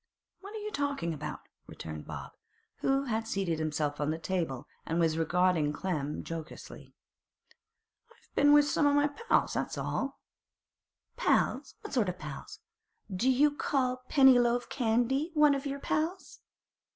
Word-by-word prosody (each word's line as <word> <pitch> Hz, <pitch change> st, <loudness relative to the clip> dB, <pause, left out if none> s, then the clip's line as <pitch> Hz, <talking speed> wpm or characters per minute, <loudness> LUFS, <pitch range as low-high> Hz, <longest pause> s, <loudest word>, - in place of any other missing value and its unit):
'What 400 Hz, +2 st, -10 dB
are -, -, -4 dB
you 425 Hz, 0 st, -5 dB
talking 280 Hz, -, -1 dB
about?' 150 Hz, -1 st, -6 dB, 0.3 s
returned 80 Hz, -1 st, -8 dB
Bob, -, -, -7 dB, 0.5 s
who 270 Hz, 0 st, +1 dB
had 225 Hz, -3 st, -2 dB
seated 190 Hz, -7 st, -1 dB
himself 150 Hz, -2 st, -1 dB
on 145 Hz, -, 0 dB
the 160 Hz, -, -1 dB
table, 165 Hz, -6 st, -2 dB, 0.2 s
and 165 Hz, +1 st, -1 dB
was 165 Hz, -2 st, +2 dB
regarding 165 Hz, -2 st, +2 dB
Clem 150 Hz, -4 st, -3 dB
jocosely. 165 Hz, -2 st, -8 dB, 1.1 s
'I've -, -, -26 dB
been 290 Hz, +1 st, +5 dB
with 295 Hz, 0 st, +6 dB
some 290 Hz, 0 st, +2 dB, 0.4 s
pals, -, -, +3 dB
that's -, -, -2 dB
all.' 275 Hz, +1 st, -2 dB, 1.0 s
'Pals! -, -, +1 dB
what 425 Hz, -, -8 dB
sort 230 Hz, -8 st, +2 dB
o' -, -, -2 dB
pals? 150 Hz, -6 st, -9 dB, 0.5 s
Do 240 Hz, +8 st, +2 dB
you 285 Hz, +3 st, +4 dB
call 255 Hz, -3 st, 0 dB
Pennyloaf 245 Hz, -3 st, +5 dB
Candy 245 Hz, +5 st, +1 dB
one 300 Hz, -1 st, +6 dB
o' 275 Hz, -, 0 dB
your 280 Hz, 0 st, -4 dB
pals? 330 Hz, +6 st, -2 dB
230 Hz, 140 wpm, -30 LUFS, -, 1.1 s, with